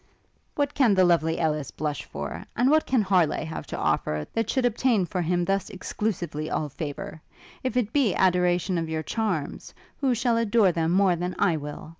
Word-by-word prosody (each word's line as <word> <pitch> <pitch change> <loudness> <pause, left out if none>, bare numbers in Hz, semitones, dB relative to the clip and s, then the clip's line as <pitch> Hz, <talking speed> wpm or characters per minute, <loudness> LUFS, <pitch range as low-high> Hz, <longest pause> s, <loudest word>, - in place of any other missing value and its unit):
'What 285 -1 0
can 240 -8 +3
the 185 - +5
lovely 165 -2 +2
Ellis 155 -4 -1
blush 150 -2 -4
for? - - -6
And 250 +4 +3
what 310 0 +3
can 255 -5 +2
Harleigh 180 -6 +2
have 160 0 -6
to - - -5
offer, 75 0 0
that 225 -1 -1
should 260 -2 +1
obtain 235 -4 +2
for 180 +1 -3
him 175 +1 0
thus 195 +1 -1
exclusively 180 -6 -3
all 150 - -2
favour? 150 +2 -6 0.4
If 255 -1 -2
it 230 -3 0
be 265 -9 +2
adoration 180 0 +2
of 165 -1 -3
your 160 0 -2
charms, 185 -6 -3 0.2
who 265 -4 +1
shall 235 0 +1
adore 225 -3 +3
them 165 -1 0
more 190 -1 +4
than 180 +2 -3
I 170 - +2
will? 150 0 -7
180 Hz, 190 wpm, -26 LUFS, 160-225 Hz, 0.4 s, the